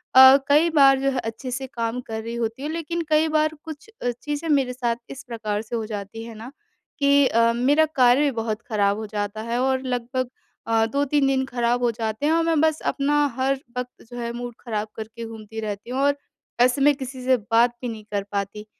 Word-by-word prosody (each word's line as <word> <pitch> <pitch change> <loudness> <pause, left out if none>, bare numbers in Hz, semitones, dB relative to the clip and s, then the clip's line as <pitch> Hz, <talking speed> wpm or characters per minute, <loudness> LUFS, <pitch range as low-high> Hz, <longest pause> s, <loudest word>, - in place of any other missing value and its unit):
अ, 260 +1 +10
कई 300 +4 +5
बार 275 -4 +5
जो 275 - +1
है 265 - -1
अच्छे 225 +3 -5
से 265 +1 -4
काम 235 0 -3
कर 220 0 -4
रही 230 +1 -5
होती 230 +3 -3
हूँ, 295 - -2
लेकिन 335 +1 -3
कई 310 +1 +4
बार 310 0 +2
कुछ 315 +6 -9
अ, 245 - +1
चीजें 295 +6 -5
मेरे 270 -4 +2
साथ 240 -2 -1
इस 270 - -8
प्रकार 215 -3 -3
से 225 +2 -6
हो 225 -2 -2
जाती 210 +1 -6
है 230 -1 -9
ना। 230 +4 -9 0.5
कि 280 0 +5
अ, 230 -1 +3
मेरा 285 +6 +4
कार्य 260 -3 +4
भी 290 -2 +2
बहुत 220 0 -3
ख़राब 205 -2 +2
हो 220 - -4
जाता 205 0 -4
है। 230 +2 -2
और 260 0 +1
लगभग 255 0 -2 0.4
अ, 225 0 +3
2-3 280 +3 +1
दिन 265 -1 +1
ख़राब 245 -1 0
हो 240 - +3
जाते 220 +3 -3
हैं 310 - +3
और 330 0 +3
मैं 325 -2 +2
बस 315 -1 +2
अपना 290 +1 +2
हर 265 +1 +1 0.2
वक़्त 250 0 -6
जो 245 - -9
है 235 0 -3
मूड 240 0 -6
ख़राब 215 -3 -3
करके 225 +1 -7
घूमती 220 -1 -8
रहती 210 +1 -5
हूँ। 255 +2 -2
और 285 0 +3 0.5
ऐसे 250 +2 +3
मैं 290 +1 +6
किसी 260 -1 -7
से 260 +1 +4 0.2
बात 235 +2 +5
भी 250 - -3
नहीं 220 -2 -7
कर 200 -1 -1
पाती। 200 +1 -3
245 Hz, 225 wpm, -23 LUFS, 225-275 Hz, 0.5 s, अ